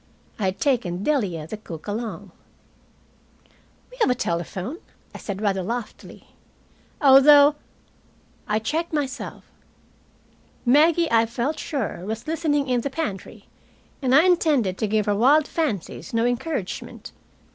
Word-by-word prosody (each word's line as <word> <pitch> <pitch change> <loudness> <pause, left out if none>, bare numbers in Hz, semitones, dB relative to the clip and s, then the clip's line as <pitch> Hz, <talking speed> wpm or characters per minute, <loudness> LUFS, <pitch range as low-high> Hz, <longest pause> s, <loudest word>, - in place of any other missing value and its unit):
I 205 - -1
had 190 0 -2
taken 205 -10 0
Delia, 200 - -1
the 190 +7 -7
cook, 165 -7 -10
along. 220 +2 -5 1.6
"We - - -14
have - - +4
a 250 - +2
telephone," 185 - -3 0.3
I - - -9
said, 200 0 -5
rather 195 -2 +1
loftily. 230 +4 -7 0.7
"Although 285 +1 +7 0.5
" - - -35
I 210 -1 +1
checked 315 +10 -2
myself. 280 -3 -4 1.2
Maggie, 320 +6 +4
I 225 0 +4
felt 240 +6 -3
sure, 260 - -4
was 220 +3 -5
listening 310 -3 0
in 250 -2 +1
the 280 - -3
pantry, 260 - -5 0.5
and 260 -1 +2
I 300 - +7
intended 300 - +2
to 215 - 0
give 215 0 +1
her 205 - +1
wild 280 +8 +4
fancies 235 - -3
no 230 +1 +2
encouragement. 245 - -4
245 Hz, 135 wpm, -23 LUFS, 205-295 Hz, 1.6 s, Although